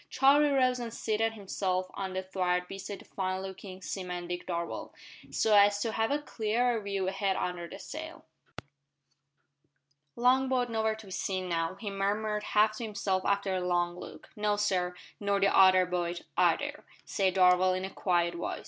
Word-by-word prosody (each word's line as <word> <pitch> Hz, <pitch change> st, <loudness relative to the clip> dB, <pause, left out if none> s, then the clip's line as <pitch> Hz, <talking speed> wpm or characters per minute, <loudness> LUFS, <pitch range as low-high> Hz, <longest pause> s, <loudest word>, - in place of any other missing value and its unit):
Charlie 280 Hz, +3 st, +5 dB
rose 255 Hz, -2 st, +2 dB
and 235 Hz, -1 st, -5 dB
seated 225 Hz, 0 st, -1 dB
himself 190 Hz, -3 st, -2 dB
on 190 Hz, -1 st, -4 dB
the 185 Hz, 0 st, -2 dB
thwart 180 Hz, -1 st, -1 dB
beside 195 Hz, +1 st, -6 dB
the -, -, -16 dB
fine 185 Hz, 0 st, -3 dB
looking 190 Hz, 0 st, -9 dB
seaman 180 Hz, -2 st, -4 dB
Dick 175 Hz, 0 st, -5 dB
Darvall, 170 Hz, -1 st, -4 dB, 0.4 s
so 215 Hz, -1 st, +2 dB
as 205 Hz, 0 st, +6 dB
to 225 Hz, -, 0 dB
have 225 Hz, 0 st, 0 dB
a 285 Hz, -, +2 dB
clearer 235 Hz, -3 st, 0 dB
view 200 Hz, -2 st, -2 dB
ahead 195 Hz, 0 st, 0 dB
under 175 Hz, -1 st, -3 dB
the -, -, -8 dB
sail. -, -, -8 dB, 1.9 s
"Long 255 Hz, +2 st, +3 dB
boat 250 Hz, -2 st, 0 dB
nowhere 220 Hz, -1 st, 0 dB
to 220 Hz, 0 st, -12 dB
be 190 Hz, -, -12 dB
seen 185 Hz, 0 st, -2 dB
now," 165 Hz, 0 st, -1 dB
he 200 Hz, +1 st, -6 dB
murmured 210 Hz, +2 st, -1 dB
half 215 Hz, +1 st, +2 dB
to -, -, -5 dB
himself 200 Hz, -3 st, -1 dB
after 200 Hz, -1 st, +1 dB
a 185 Hz, -, -1 dB
long 175 Hz, -1 st, 0 dB
look. 180 Hz, -, -11 dB
"No, 210 Hz, 0 st, +1 dB
sir 185 Hz, -3 st, 0 dB, 0.2 s
nor 200 Hz, -1 st, +1 dB
the 195 Hz, 0 st, +3 dB
other 185 Hz, -1 st, +7 dB
boat 175 Hz, -1 st, -2 dB
either," -, -, +1 dB, 0.2 s
said 190 Hz, -2 st, 0 dB
Darvall 185 Hz, 0 st, +5 dB
in 185 Hz, -, -3 dB
a 190 Hz, -, -6 dB
quiet 175 Hz, -3 st, +1 dB
voice. 170 Hz, -, -4 dB
195 Hz, 175 wpm, -30 LUFS, 185-215 Hz, 1.9 s, other